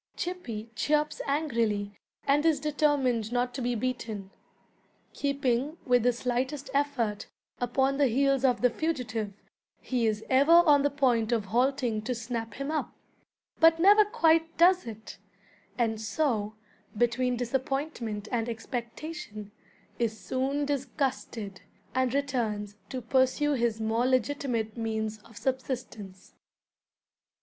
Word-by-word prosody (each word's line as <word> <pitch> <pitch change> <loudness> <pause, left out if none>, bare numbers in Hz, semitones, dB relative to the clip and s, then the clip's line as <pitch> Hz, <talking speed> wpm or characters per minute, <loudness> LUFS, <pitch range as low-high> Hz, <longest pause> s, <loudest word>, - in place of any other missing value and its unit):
Chippy 235 -12 -5
chirps 300 +4 0
angrily, 230 -9 -1 0.3
and 285 +2 +3
is 320 -3 +3
determined 280 -7 +1
not 245 0 0
to 265 - -4
be 245 0 0
beaten. 220 -5 -3 0.8
Keeping, 280 +1 0
with 245 -1 +4
the 245 +2 +4
slightest 260 +3 -2
effort, 270 -7 0 0.3
upon 265 +3 +1
the 280 - +5
heels 275 +2 +2
of 250 -3 +3
the 250 -1 +4
fugitive, 235 -10 -2 0.5
he 245 -3 0
is 215 0 -1
ever 275 +5 +5
on 315 -4 +7
the 285 - +2
point 250 -6 +1
of 225 -4 +1
halting 245 0 +1
to 245 +3 -3
snap 230 -2 -4
him 275 +2 -3
up, 315 - -2 0.7
but 325 0 +6
never 410 +4 +7
quite 325 -5 +2
does 360 -2 +5
it; 220 -1 -9 0.6
and 225 -2 0
so, 220 -2 -1 0.4
between 245 +2 +1
disappointment 250 -3 -2
and 235 -1 -1
expectation, 235 - -6 0.5
is 225 -2 -1
soon 275 +3 -1
disgusted, 260 -7 -3 0.3
and 260 0 +1
returns 225 -7 -1
to 255 -2 -5
pursue 260 +4 +2
his 235 -4 0
more 225 +3 +1
legitimate 250 -3 0
means 220 -2 -2
of 225 +1 -17
subsistence. 235 -6 -4
250 Hz, 125 wpm, -28 LUFS, 225-280 Hz, 0.8 s, on